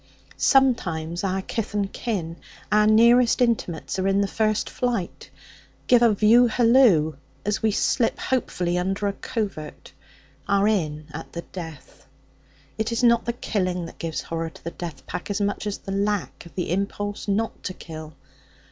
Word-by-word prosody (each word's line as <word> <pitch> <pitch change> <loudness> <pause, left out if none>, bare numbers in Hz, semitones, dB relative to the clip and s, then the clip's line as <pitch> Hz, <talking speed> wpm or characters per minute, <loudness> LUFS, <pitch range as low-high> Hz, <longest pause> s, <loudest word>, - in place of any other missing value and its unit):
Sometimes 175 - +2
our 190 0 -1
kith 220 0 -4
and 200 -1 -1
kin, 175 -8 -3 0.3
our 210 0 +5
nearest 235 +3 +5
intimates, 215 -8 0
are 190 - +1
in 195 +1 +3
the 200 - +1
first 215 0 0
flight; 235 -8 -3 0.6
give 245 -1 +5
a 235 -2 +6
view 220 +4 +5
hallo 230 - +4 0.3
as 210 0 0
we 220 - +3
slip 225 +3 +1
hopefully 180 -9 -1
under 195 +3 -1
a 200 - 0
covert; 195 -10 -5 0.5
are 200 +1 +3
in 155 -8 0
at 160 +2 -8
the 170 - -5
death. 160 -8 -10 0.7
It 220 +1 0
is 230 +2 -1
not 235 -1 +4
the 235 - -1
killing 185 -7 -2
that 165 - -12
gives 165 -2 -3
horror 165 0 -4
to - - -17
the 170 - -4
death 170 -3 -8
pack - - -5
so 205 +1 0
much 205 +1 -3
as 205 - -2
the 195 - -8
lack 200 -3 -2
of - - -18
the 180 -3 -2
impulse 200 +2 -2
not 215 +3 -1
to 185 - -3
kill. 155 -3 -9
200 Hz, 165 wpm, -24 LUFS, 175-225 Hz, 0.7 s, a